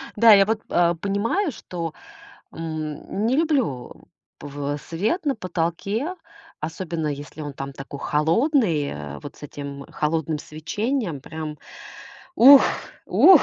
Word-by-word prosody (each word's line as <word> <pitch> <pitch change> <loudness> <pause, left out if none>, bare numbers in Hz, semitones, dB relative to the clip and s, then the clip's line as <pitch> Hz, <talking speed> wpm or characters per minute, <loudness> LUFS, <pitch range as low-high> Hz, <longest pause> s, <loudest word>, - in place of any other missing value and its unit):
Да, 225 +1 +8
я 195 -1 +7
вот, 220 +1 0
а, 175 0 +3
понимаю, 205 - 0
что, 170 - -6 0.6
м, 160 +5 -4
не 250 +3 +2
люблю 265 - 0 0.5
пв 145 0 -4
свет 215 - -1
на 280 - +2
потолке. 190 - -2 0.5
Особенно, 160 0 -3
если 145 +1 -6
он 145 -1 -5
там 135 +1 -6
такой 135 +1 -8
холодный, 165 - +2
а 75 0 -7
вот 145 - -9
с - - -18
этим 140 -1 -7
холодным 155 0 -1
свечением. 175 - -3
Прям 155 +1 -6 0.8
ух, 275 0 +10 0.4
ух. 370 -6 +7
165 Hz, 125 wpm, -23 LUFS, 150-220 Hz, 0.8 s, ух